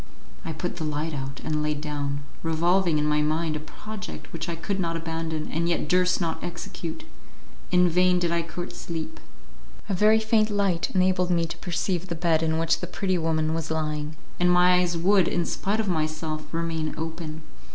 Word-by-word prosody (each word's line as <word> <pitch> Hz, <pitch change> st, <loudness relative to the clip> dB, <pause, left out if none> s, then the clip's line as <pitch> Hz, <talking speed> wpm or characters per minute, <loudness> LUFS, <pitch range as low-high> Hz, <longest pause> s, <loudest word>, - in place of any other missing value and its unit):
I 165 Hz, -, -4 dB
put 175 Hz, +3 st, -4 dB
the 165 Hz, -, -3 dB
light 155 Hz, +1 st, -2 dB
out 135 Hz, -1 st, -5 dB
and 155 Hz, -1 st, 0 dB
laid 150 Hz, -1 st, -1 dB
down, 145 Hz, -1 st, -3 dB, 0.2 s
revolving 170 Hz, +1 st, +2 dB
in 150 Hz, -, +1 dB
my 150 Hz, 0 st, +3 dB
mind 155 Hz, +1 st, +1 dB
a -, -, -2 dB
project 210 Hz, +6 st, -8 dB
which 165 Hz, +1 st, -4 dB
I 170 Hz, -, -2 dB
could 195 Hz, +4 st, -3 dB
not 165 Hz, -2 st, 0 dB
abandon, 160 Hz, -1 st, -3 dB
and 170 Hz, +2 st, 0 dB
yet 170 Hz, -3 st, 0 dB
durst 180 Hz, +2 st, +3 dB
not 165 Hz, -3 st, -2 dB
execute. 170 Hz, -, -5 dB, 0.7 s
In 180 Hz, 0 st, +5 dB
vain 180 Hz, +1 st, +4 dB
did 175 Hz, -1 st, +1 dB
I 170 Hz, 0 st, +2 dB
court 175 Hz, +2 st, -6 dB
sleep. 165 Hz, -2 st, -5 dB, 0.7 s
A 200 Hz, -, -1 dB
very 215 Hz, +4 st, +5 dB
faint 220 Hz, 0 st, +3 dB
light 200 Hz, -5 st, +1 dB
enabled 185 Hz, -1 st, +3 dB
me 170 Hz, -2 st, +2 dB
to 165 Hz, -, -5 dB
perceive 180 Hz, 0 st, -1 dB
the 170 Hz, -, -3 dB
bed 165 Hz, -1 st, +2 dB
in 160 Hz, 0 st, +1 dB
which 165 Hz, 0 st, +2 dB
the 180 Hz, -, -4 dB
pretty 185 Hz, 0 st, 0 dB
woman 160 Hz, -1 st, +1 dB
was 160 Hz, -1 st, -2 dB
lying, 155 Hz, -1 st, -2 dB, 0.2 s
and 180 Hz, 0 st, +4 dB
my 180 Hz, 0 st, +6 dB
eyes 175 Hz, -1 st, +1 dB
would, 190 Hz, +1 st, +4 dB
in 175 Hz, -, 0 dB
spite 205 Hz, +6 st, -1 dB
of 220 Hz, -, 0 dB
myself, 155 Hz, -2 st, -2 dB
remain 165 Hz, -2 st, -2 dB
open. 160 Hz, -1 st, -5 dB
165 Hz, 195 wpm, -26 LUFS, 155-180 Hz, 0.7 s, my